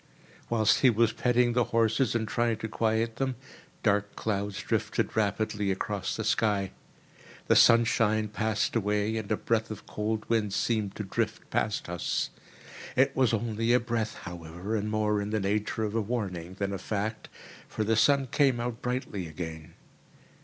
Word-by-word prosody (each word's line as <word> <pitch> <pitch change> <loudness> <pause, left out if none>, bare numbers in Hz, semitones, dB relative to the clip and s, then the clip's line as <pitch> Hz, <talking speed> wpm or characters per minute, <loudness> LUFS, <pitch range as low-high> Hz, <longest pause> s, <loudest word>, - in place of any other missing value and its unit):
Whilst 110 -2 +3
he 130 - +6
was 115 0 +3
petting 125 -1 +2
the 120 -1 +2
horses 115 +2 +2
and 110 -2 0
trying 115 0 +1
to 110 - -4
quiet 110 +1 0
them, 130 -1 -1 0.5
dark 105 -1 +1
clouds 100 -2 -2
drifted - - -1
rapidly 105 -1 0
across 95 0 -2
the 110 - -3
sky. 105 -3 +1 0.7
The - - +4
sunshine 115 -2 +5
passed 110 +1 -1
away, 105 0 +1
and 110 -2 -5
a - - +2
breath 110 -1 0
of 110 -2 -8
cold 105 +1 -3
wind 110 -4 +1
seemed 105 -4 0
to 105 - -4
drift 95 - -2
past 105 - -1
us. 85 0 -2 0.6
It 135 +2 +3
was 130 -4 +3
only 115 +1 0
a 125 - +5
breath, 115 -2 -2
however, 85 +4 -5
and 105 0 -1
more 105 -1 +1
in 100 - -3
the 110 0 0
nature 105 +3 -1
of 105 -1 -2
a 115 - +1
warning 95 -6 -3
than 100 0 -2
a 95 - -3
fact, 110 +1 -3 0.4
for 110 - -2
the 110 +1 +2
sun 140 +4 +4
came 130 -1 +2
out 120 -1 -3
brightly 125 -7 -3
again. 80 -1 -7
110 Hz, 165 wpm, -28 LUFS, 100-115 Hz, 0.7 s, he